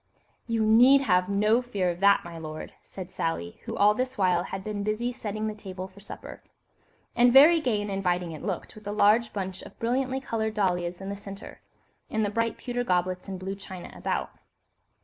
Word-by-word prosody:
'" - - -41
"You 220 -1 +2
need 245 +6 +7
have 180 -7 +2
no 210 +4 +3
fear 200 -8 -1
of 170 - -8
that, 200 +1 +5
my 170 -1 -8
lord," 155 -1 -7
said 185 -1 -9
Sally, 85 - -3
who - - -5
all 205 +1 +5
this 255 +3 -3
while 180 -2 +2
had 190 0 -5
been 210 -1 -3
busy 215 +4 -1
setting 215 -3 -4
the 215 - -2
table 190 -3 -7
for 190 +1 -17
supper. 200 - -10 0.7
And 245 0 +5
very 310 +6 +8
gay 220 -7 0
and 205 - -4
inviting 180 -3 -1
it 155 - -8
looked, 190 -5 -4
with 215 -1 -12
a - - -2
large 215 +2 +4
bunch 190 -2 -4
of - - -13
brilliantly 260 +3 0
coloured 220 -4 -2
dahlias 180 -3 0
in 195 - -5
the 200 - -3
centre, 200 -1 -10 0.5
and 220 -1 0
the 205 - -2
bright 230 +1 -1
pewter 245 -1 -3
goblets 180 -3 0
and 190 -1 -5
blue 190 +1 -4
china 190 -2 -9
about. - - -2
200 Hz, 205 wpm, -27 LUFS, 185-225 Hz, 0.7 s, very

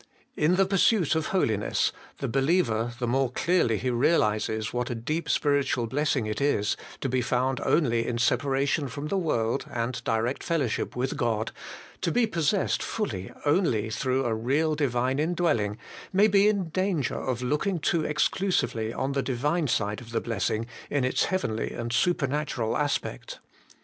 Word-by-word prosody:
In 155 +4 +3
the 195 +1 +4
pursuit 195 -2 +3
of 160 -1 0
holiness, 110 - +1 0.3
the - - -3
believer, 135 -4 +1
the 125 - -2
more 130 +1 +1
clearly 145 -7 +2
he 130 +3 -1
realizes 110 -5 +1
what 125 0 -1
a 120 - -2
deep 155 +9 -3
spiritual 140 -4 +1
blessing 135 -1 0
it 110 +5 -3
is, 120 -8 +1 0.3
to - - 0
be 130 0 +1
found 125 +2 0
only 120 -7 +2
in 120 - -1
separa 135 +3 +1
tion 145 0 0
from 140 +5 -5
the 200 - 0
world, 115 -10 0
and 120 +1 -3
direct 115 +4 -1
fellowship 150 -9 -1
with 130 +2 -1
God, 110 -2 0 0.5
to - - 0
be 245 -1 +3
possessed 175 -1 0
fully 100 - -3
only 135 - +2
through 130 +4 0
a 115 - +1
real 140 +8 +1
Divine 130 -2 0
indwelling, 155 -11 +1 0.3
may 195 +2 +5
be 200 0 +4
in 200 -5 +1
danger 185 -5 0
of 125 -1 -2
looking 150 +9 0
too 165 0 +1
exclusively 150 - 0
to 135 - -2
the 140 - +1
Divine 145 +6 0
side 105 -3 -1
of 115 - -12
the 115 - 0
blessing, 115 0 -1 0.2
in 145 -2 0
its 130 - +1
heavenly 150 - -1
and 120 0 -4
supernatural 140 -5 0
aspect. 145 - -2
135 Hz, 165 wpm, -27 LUFS, 115-160 Hz, 0.5 s, may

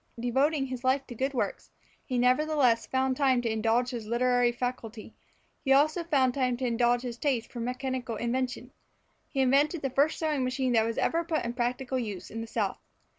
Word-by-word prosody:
Devoting 270 +4 +1
his 255 -1 -6
life 265 +1 +2
to - - -9
good 265 +4 -2
works, - - -2 0.3
he 255 - -3
nevertheless 255 -1 +3
found 260 0 0
time 265 -2 +3
to 230 - 0
indulge 225 +3 +1
his 230 -4 -6
literary 245 +1 +2
faculty; 240 -3 -5 0.5
he 270 - 0
also 310 +5 +3
found 270 -6 +2
time 255 -2 0
to 255 - -3
indulge 240 +1 +2
his 240 -2 -6
taste 260 -6 -1
for 240 - -7
mechanical 250 0 -3
invention. 245 +3 -2 0.6
He 270 - -1
invented 285 +5 +2
the 270 - -1
first 285 +4 +2
sewing 305 -4 0
machine 255 0 0
that 220 -1 +4
was 230 0 -3
ever 335 +1 +1
put 320 -6 -1
in 235 - -3
practical 250 +2 -2
use 210 -6 -6
in 225 - -5
the 225 - -6
South. 215 -3 -2
255 Hz, 190 wpm, -28 LUFS, 240-270 Hz, 0.6 s, that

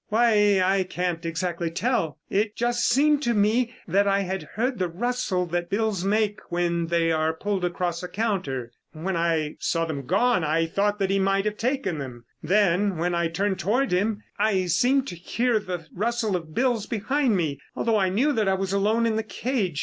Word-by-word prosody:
"Why, 210 -3 +4
I 190 +1 +2
can't 180 -2 -2
exactly 170 0 -2
tell. 170 - -1
It 210 +2 0
just 240 0 +1
seemed 295 +2 +3
to 240 -4 +1
me 225 +4 +2
that 200 +4 +2
I 200 0 +2
had 190 0 -3
heard 245 +2 -1
the 180 - +1
rustle 195 0 -1
that 175 0 -3
bills 205 -3 0
make 210 +1 +1
when 170 -1 0
they 165 -1 +1
are 160 0 +1
pulled 200 +2 -2
across 175 -1 -1
a 180 - -5
counter. 180 - -2 0.2
When 170 +4 -3
I 165 -3 0
saw 165 -1 0
them 140 -5 -5
gone, 205 - +2
I 160 +2 +1
thought 205 +5 0
that 195 -1 0
he 195 - +2
might 195 +1 +1
have 210 0 -2
taken 235 - -1
them. 125 -4 -8 0.2
Then 195 +1 +2
when 175 +2 0
I 170 0 +1
turned 190 +3 -1
toward 235 +10 +1
him, 205 +4 0 0.2
I 200 -3 +2
seemed 250 +10 +2
to - - -6
hear 230 +7 0
the 180 -5 -5
rustle 225 0 0
of 165 -3 -6
bills 240 -4 +1
behind 245 +1 +1
me, 150 -5 -1 0.2
although 225 -2 +1
I 190 -2 +2
knew 245 +11 +2
that 220 -5 +1
I 190 - +3
was 190 0 -2
alone 215 +4 +2
in 220 -1 +1
the - - +1
cage. 220 - -2
195 Hz, 195 wpm, -25 LUFS, 170-220 Hz, 0.2 s, Why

